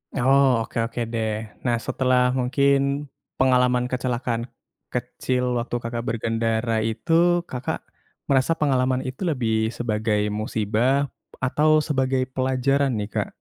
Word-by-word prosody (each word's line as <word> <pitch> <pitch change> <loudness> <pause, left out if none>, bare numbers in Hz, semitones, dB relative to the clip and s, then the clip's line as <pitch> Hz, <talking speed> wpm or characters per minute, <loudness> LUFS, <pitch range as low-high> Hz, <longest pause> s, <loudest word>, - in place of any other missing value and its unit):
Oh 130 -2 +4
oke - - -8
oke 120 - -7
deh. 110 -1 0 0.3
Nah, 120 -1 +2
setelah 130 -1 +2 0.2
mungkin 140 +2 +2 0.3
pengalaman 125 -1 +3
kecelakaan 120 -2 -1 0.5
kecil 125 +1 -2 0.2
waktu 120 +1 -3
Kakak 115 0 -3
berkendara 115 0 0 0.2
itu 140 +9 -5 0.4
Kakak 125 0 -4 0.4
merasa 135 +2 +2
pengalaman 130 -4 +1
itu 130 +5 -7
lebih 125 -7 0 0.2
sebagai 105 -2 0
musibah 110 +6 0 0.3
atau 150 +4 +2 0.2
sebagai 130 -2 +1
pelajaran 130 +1 +1
nih, 105 - -3
Kak? - - 0
125 Hz, 115 wpm, -23 LUFS, 115-135 Hz, 0.5 s, Oh